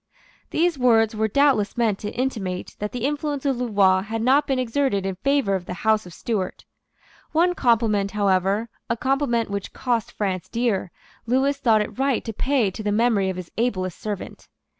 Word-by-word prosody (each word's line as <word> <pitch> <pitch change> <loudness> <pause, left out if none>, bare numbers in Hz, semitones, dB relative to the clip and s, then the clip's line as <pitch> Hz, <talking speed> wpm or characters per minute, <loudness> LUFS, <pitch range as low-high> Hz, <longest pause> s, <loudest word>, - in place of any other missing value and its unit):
These 335 -3 +1
words 225 -3 +4
were 220 +1 +1
doubtless 255 -4 +2
meant 220 -4 +1
to 210 - -4
intimate 210 -8 -3
that 210 0 -3
the 245 0 -3
influence 290 -1 -2
of 270 -3 +1
Louvois 200 -6 +3
had 220 +2 -4
not 275 +4 +4
been 270 - +1
exerted 250 -5 0
in 195 - -1
favour 275 -3 +1
of 185 -2 -2
the 180 - -4
House 220 -3 +3
of 175 - -12
Stuart. 205 -6 -3 0.7
One 345 +3 +3
compliment, 225 - +2
however, 200 +2 +1 0.2
a 230 - 0
compliment 260 -4 0
which 200 -1 -4
cost 240 -4 -1
France 190 -4 -3
dear, 230 -6 0 0.4
Lewis 270 +3 +2
thought 225 -6 +4
it 210 - -5
right 270 -3 +1
to 225 - -4
pay 250 -3 +1
to 200 - -7
the 210 -1 -1
memory 210 -3 +2
of 185 - -4
his 180 -2 -8
ablest 185 -7 -1
servant. 210 -3 -6
225 Hz, 180 wpm, -23 LUFS, 200-260 Hz, 0.7 s, words